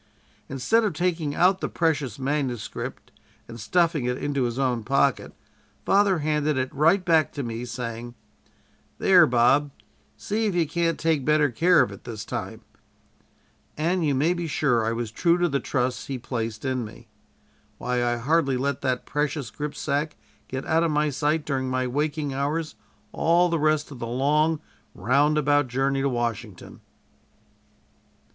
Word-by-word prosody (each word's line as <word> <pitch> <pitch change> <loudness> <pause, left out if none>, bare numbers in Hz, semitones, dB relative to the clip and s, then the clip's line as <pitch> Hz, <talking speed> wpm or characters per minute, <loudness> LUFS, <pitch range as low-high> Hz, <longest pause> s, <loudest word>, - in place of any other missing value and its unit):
"Instead 135 - +1
of 210 -5 0
taking 165 -3 -1
out 185 +2 +3
the - - -2
precious 150 - -1
manuscript 135 -4 -4 0.4
and 115 0 -10
stuffing 160 +4 +1
it 125 0 -1
into 140 -3 -1
his 120 0 -3
own 125 -4 0
pocket, 135 +2 +1 0.5
father 200 -1 +3
handed 150 -1 +1
it 130 0 -2
right 165 +7 +3
back 160 -3 +3
to 140 - -5
me, 115 0 -4
saying: 120 0 -6 0.8
"'There, 180 -4 +6
Bob, 125 +4 +3 0.5
see 220 +2 -1
if 195 - -2
you 170 -2 +2
can't 170 +1 0
take 160 -4 +1
better 150 -1 +3
care 170 +7 +4
of - - -4
it 100 - -11
this 110 -4 -7
time' - - -6 1.1
and 170 +3 0
you 145 -3 +1
may 155 +7 +2
be 175 -1 -4
sure 135 -6 +1
I 115 - 0
was 115 -1 -3
true 170 +7 +2
to 175 0 +2
the 140 -3 0
trust 125 -2 -2
he 135 - -3
placed 115 -1 -4
in 130 -2 -1
me. 110 +2 -11 0.7
Why, 125 0 -1
I 120 0 0
hardly 140 +1 +1
let 140 +1 -2
that 130 -2 -1
precious 145 -4 -2
gripsack 150 0 -3 0.3
get 130 +2 -5
out 160 +1 +2
of 170 - +1
my 150 0 +1
sight 150 +3 0
during 130 -2 -2
my 130 0 0
waking 145 +2 -2
hours 150 +4 -2 0.4
all 175 +2 +3
the 165 -1 0
rest 155 0 +1
of 135 - -9
the 115 - -4
long 150 +6 +1 0.3
roundabout 145 +5 +2
journey 135 +2 0
to 140 - +1
Washington." 115 -5 -4
140 Hz, 160 wpm, -25 LUFS, 125-160 Hz, 1.1 s, There